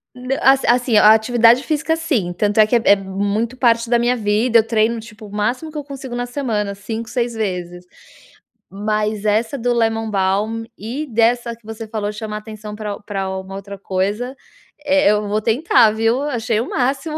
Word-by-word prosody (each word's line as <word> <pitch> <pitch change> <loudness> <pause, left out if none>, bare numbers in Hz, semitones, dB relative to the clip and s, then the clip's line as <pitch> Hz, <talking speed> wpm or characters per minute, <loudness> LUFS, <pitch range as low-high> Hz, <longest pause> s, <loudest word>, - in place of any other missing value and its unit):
Na 255 +2 -3
as 270 +1 +4
assim, 240 -2 +3
a 215 +1 +8
atividade 235 +2 +4
física 320 +1 0
sim, 250 - -1
tanto 205 +3 0
é 215 - +8
que 215 - 0
é 235 - +3
é 200 - +6
muito 200 +5 -2
parte 235 -2 +2
da 240 -1 +3
minha 240 +1 +2
vida, 220 +2 +2
eu 220 - +1
treino 225 +1 +1
tipo 220 -1 -12
o - - -14
máximo 240 +9 -2
que 305 - -8
eu 295 - -4
consigo 270 -3 -8
na 245 0 -2
semana, 230 -6 -2
5, 220 +3 -6
6 240 -1 -1
vezes, 180 -4 -4 0.8
mas 210 +1 -2
essa 220 +5 +1
do 245 0 -1
lemon 225 -1 0
balm 205 +4 0
e 245 +9 -5
dessa 235 +1 +1
que 230 - -31
você 225 0 -7
falou 210 -1 -3
de - - -12
chamar 215 -1 -5
atenção 215 -1 -8
pra 210 -1 -5
pra 195 -2 -4
uma 190 0 -8
outra 200 0 -8
coisa, 205 +8 -2 0.5
eh, 285 -4 +4
eu 210 0 0
vou 210 +1 0
tentar, 230 0 +3
viu, 225 +4 +1
achei 230 -6 -1
o 250 - -4
máximo 275 +5 -1
225 Hz, 195 wpm, -19 LUFS, 210-245 Hz, 0.8 s, a